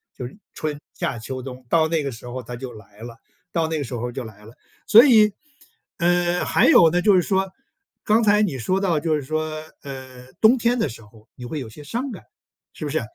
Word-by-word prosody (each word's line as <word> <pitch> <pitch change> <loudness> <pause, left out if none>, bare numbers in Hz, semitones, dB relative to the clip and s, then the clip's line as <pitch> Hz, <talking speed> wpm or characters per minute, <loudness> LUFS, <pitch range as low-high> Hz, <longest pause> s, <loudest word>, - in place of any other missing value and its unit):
就 125 - -5
是 135 - -14 0.2
春、 150 -2 -4
夏、 125 - -3
秋、 130 +3 -6
冬， 130 0 -9
到 160 +1 +3
那 160 -2 0
个 140 - -3
时 120 +1 -11
候 125 +1 -6
它 120 +2 -7
就 125 +1 -7
来 105 -1 -15
了 115 0 -9 0.3
到 165 -2 0
那 160 0 -2
个 - - -2
时 130 - -8
候 120 +1 -3
就 130 +1 -5
来 105 -2 -12
了。 110 - -13 0.3
所 230 +5 +9
以， 215 -6 +6 0.6
嗯， 175 0 +1
还 - - +3
有 165 - +7
呢 175 +2 +1
就 205 0 +5
是 180 - +5
说 190 +1 0 0.5
刚 220 +2 +3
才 210 0 +4
你 175 -11 0
说 185 +11 0
到 175 -6 +1
就 155 0 0
是 150 - -3
说， 155 +3 -2 0.3
呃， 130 -2 -10
冬 225 +4 +6
天 240 +1 +1
的 155 - 0
时 115 - -10
候 110 +1 -19
你 125 - -9
会 150 +5 -4
有 125 -5 -7
些 150 +7 -12
伤 240 - -4
感， 205 - -9 0.5
是 155 - -7
不 145 - -3
是？ 160 - 0
150 Hz, 250 characters per minute, -22 LUFS, 125-180 Hz, 0.6 s, 所